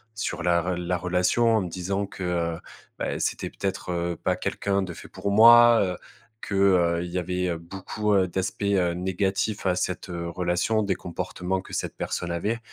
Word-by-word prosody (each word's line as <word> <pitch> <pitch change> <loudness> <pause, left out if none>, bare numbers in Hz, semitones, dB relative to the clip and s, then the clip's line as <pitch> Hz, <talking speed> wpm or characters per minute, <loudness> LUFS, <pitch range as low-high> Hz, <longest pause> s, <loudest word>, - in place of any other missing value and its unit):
sur 85 -5 -3
la 85 -1 +3
re 90 +1 -2
la 90 +1 -1
relation 90 +6 +2
en 110 - +1
me 90 - -5
disant 95 +3 -2
que, 95 - -8
heu 85 -2 -1 0.4
bah, - - -2
c'était - - -2
peut-être, 95 -2 -4
heu, 85 0 -1
pas - - -1
quelqu'un 100 -1 -1
de 90 -2 -5
fait - - -12
pour 100 - -3
moi. 120 +2 +8
Heu, 90 -2 -2 0.4
que, 100 - -4
heu, 90 -3 +3
il - - -6
y 90 - -1
avait 90 0 -1
beaucoup, 95 +5 -4
heu, 95 -2 +3
d'aspects, 95 +3 -3
heu, 95 -4 +2
négatifs 95 +3 -1
à 90 -1 +2
cette, 90 +1 -3
heu, 85 -1 -4
relation, 90 +5 0
des 100 -2 0
comportements 90 +2 -4
que - - -15
cette - - -3
personne 85 -1 -3
avait. 105 +7 -1
90 Hz, 195 wpm, -25 LUFS, 85-100 Hz, 0.4 s, moi